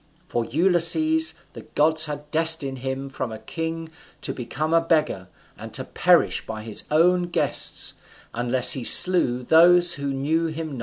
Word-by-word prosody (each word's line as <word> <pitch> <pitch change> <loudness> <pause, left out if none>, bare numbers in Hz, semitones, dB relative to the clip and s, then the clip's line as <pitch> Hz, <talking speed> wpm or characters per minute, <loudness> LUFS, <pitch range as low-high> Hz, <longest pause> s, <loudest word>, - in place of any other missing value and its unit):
For 120 -9 -4
Ulysses, 190 - +2 0.2
the - - -11
gods 155 +1 0
had 150 -1 -9
destined 160 -5 +3
him 130 +1 -6
from 130 -3 -7
a 110 - -8
king 165 +7 -7 0.3
to - - -3
become 145 +6 -5
a 165 - +3
beggar, 155 - -2 0.3
and - - -10
to - - -2
perish - - 0
by 110 -1 -8
his 110 -2 -2
own 175 +3 +1
guests, - - 0 0.4
unless 125 +1 +2
he 130 - -4
slew 125 -5 +4
those 175 +5 +4
who 140 -1 -5
knew 155 +5 -2
him 160 -2 -7
not_. - - -9
155 Hz, 160 wpm, -21 LUFS, 130-165 Hz, 0.4 s, slew